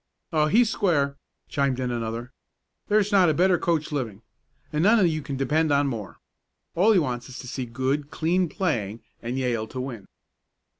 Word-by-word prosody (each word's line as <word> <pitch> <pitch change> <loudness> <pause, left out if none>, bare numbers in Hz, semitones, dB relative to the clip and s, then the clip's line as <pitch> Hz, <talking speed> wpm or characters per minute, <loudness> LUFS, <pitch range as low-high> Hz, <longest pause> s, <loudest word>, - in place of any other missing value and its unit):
"Oh, 155 -1 +3
he's 230 +8 +4
square," 145 -10 +1 0.3
chimed 140 -2 0
in 125 -1 -1
another. 115 +1 -4 0.5
"There's 210 0 +2
not 190 -4 +5
a 155 - +1
better 180 +1 +3
coach 160 -3 0
living, 115 -7 -3 0.5
and 150 - +1
none 210 0 +5
you 155 -2 -1
can 140 -1 -5
depend 150 +4 +1
on 140 0 +3
more. 110 -8 -4 0.6
All 195 +6 +4
he 210 - +5
wants 125 -6 -1
is 130 - -9
to 125 - -8
see 130 -1 -4
good, 130 +5 -1
clean 175 +3 +1
playing, 120 - -2 0.2
and 120 +2 -3
Yale 120 -4 -1
to 130 - -7
win." 120 -7 -6
140 Hz, 180 wpm, -25 LUFS, 125-170 Hz, 0.6 s, not